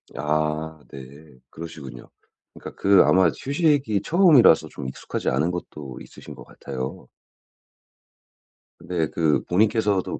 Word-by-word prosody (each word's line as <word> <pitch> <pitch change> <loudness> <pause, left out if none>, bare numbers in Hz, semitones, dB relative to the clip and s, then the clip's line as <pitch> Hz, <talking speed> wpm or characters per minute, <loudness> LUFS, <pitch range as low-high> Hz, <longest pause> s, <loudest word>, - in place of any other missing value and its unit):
아 75 +2 -2
네. 70 +1 -13
그러시군요. 75 -7 -10 0.4
그러니까 - - -12
그 100 -1 +5
아마 95 -2 +4
휴식이 140 - 0
처음이라서 155 - +5
좀 70 -2 -8
익숙하지 - - -4
않은 75 +7 0
것도 75 -6 -8
있으신 - - -12
것 - - -12
같아요. 65 -2 -8 1.7
네. 85 -3 -2
그 80 -3 0
본인께서도 105 0 0
80 Hz, 265 characters per minute, -23 LUFS, 70-100 Hz, 1.7 s, 그